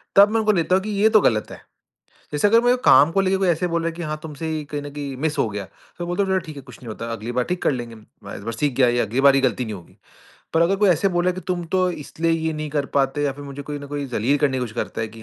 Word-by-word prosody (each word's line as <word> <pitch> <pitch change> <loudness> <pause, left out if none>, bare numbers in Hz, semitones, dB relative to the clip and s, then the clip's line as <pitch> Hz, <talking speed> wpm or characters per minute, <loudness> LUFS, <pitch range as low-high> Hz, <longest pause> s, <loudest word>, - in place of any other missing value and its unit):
तब 200 +1 +8
मैं 225 - +2
उनको 215 -1 +3
लेता 180 -2 +2
हूँ 190 - +1
कि 215 - -5
ये 220 - +6
तो 215 -1 +5
गलत 110 - +1
है। - - -10 0.7
जैसे 150 +7 +3
अगर 230 +3 +5
मेरे 245 +1 +4
काम 145 - +7
को 195 - +2
लेके 190 0 +1
कोई 190 -1 +1
ऐसे 175 +1 +1
बोल 170 -1 -1
रहा 165 - -1
है - - -5
कि, 170 - -8
"हाँ, 155 -2 -3
तुमसे 160 0 -6
ही 155 -1 -2
कहीं 145 0 -5
न 145 - -7
कहीं 140 -2 -5
मिस 160 -1 0
हो - - +2
गया," 100 -1 -5 0.3
तो 175 - -4
बोलता 175 +3 0
हूँ, 195 - -3
"चलो 190 - +3
ठीक 155 - -9
है, 140 - -8
कुछ 125 -3 -14
नहीं 125 - -12
होता, 110 +1 -6
अगली 115 +1 -5
बार 125 - +3
ठीक 180 0 -3
कर - - +3
लेंगे। 120 -3 -5
मैं 110 -1 -13
इस - - -10
बार 115 +2 -4
सीख 140 +4 -1
गया 130 -2 +5
ये 120 0 +1
अगली 120 +4 0
बार 140 0 +6
ये 135 - +3
गलती 125 -2 +1
नहीं 110 - -5
होगी," 90 -3 -15 0.6
पर 165 - +4
अगर 185 +4 +2
कोई 205 0 +3
ऐसे 175 +3 +2
बोला 175 +1 +2
है - - -4
कि, 185 - -6
"तुम 180 -2 -3
तो 185 +1 +1
इसलिए 165 +1 -3
ये 160 0 -1
नहीं 155 0 -4
कर 145 -1 -1
पाते" 135 +1 0
या 140 - 0
फिर 145 +1 -10
मुझे 140 0 -7
कोई 145 +1 -6
ना 145 - -9
कोई 145 0 -4
जलील 125 +7 +2
करने 135 -2 +1
की - - -3
कोशिश 110 -3 -9
करता - - -3
है 115 - -2
कि 110 0 -13
150 Hz, 330 wpm, -22 LUFS, 130-175 Hz, 0.7 s, तब